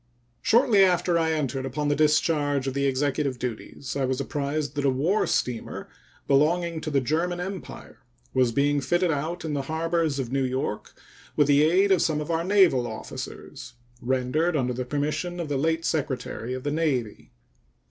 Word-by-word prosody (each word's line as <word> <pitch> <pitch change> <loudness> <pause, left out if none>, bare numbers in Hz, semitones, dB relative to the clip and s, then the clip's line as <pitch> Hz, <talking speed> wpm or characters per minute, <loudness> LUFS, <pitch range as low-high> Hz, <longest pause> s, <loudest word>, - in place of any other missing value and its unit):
Shortly 230 -4 +5
after 180 -2 +2
I 160 -1 +1
had 160 - 0
entered 135 -2 -2
upon 145 +3 -2
the 145 - +2
discharge 150 -2 +2
of 135 - -2
the 140 0 +1
Executive 135 0 0
duties 120 +2 -6
I 140 - 0
was 130 0 -1
apprised 145 +2 -2
that 145 - -2
a 140 - +3
war 155 +11 +1
steamer 120 -3 -2 0.4
belonging 160 +4 +2
to 155 - -4
the 140 -2 +2
German 165 +7 -1
Empire 190 +1 -7 0.3
was 125 -2 +3
being 145 +3 +1
fitted 175 +5 +1
out 160 +4 -3
in 155 - -2
the 140 - -1
harbor 165 +4 -1
of 140 -6 -1
New 135 0 +1
York 130 -4 -3 0.4
with 150 - +4
the 145 0 +4
aid 185 +5 +3
of 185 - +4
some 155 -2 +1
of 150 +2 -4
our 165 0 0
naval 180 -10 +4
officers, 120 +1 -8 0.3
rendered 130 +7 0
under 125 -2 0
the 125 +1 -4
permission 150 +6 -2
of 165 -3 -4
the 140 - 0
late 165 +3 0
Secretary 130 -4 -2
of 130 - -7
the 145 - -1
Navy. 140 -9 -1
145 Hz, 180 wpm, -25 LUFS, 130-165 Hz, 0.4 s, Shortly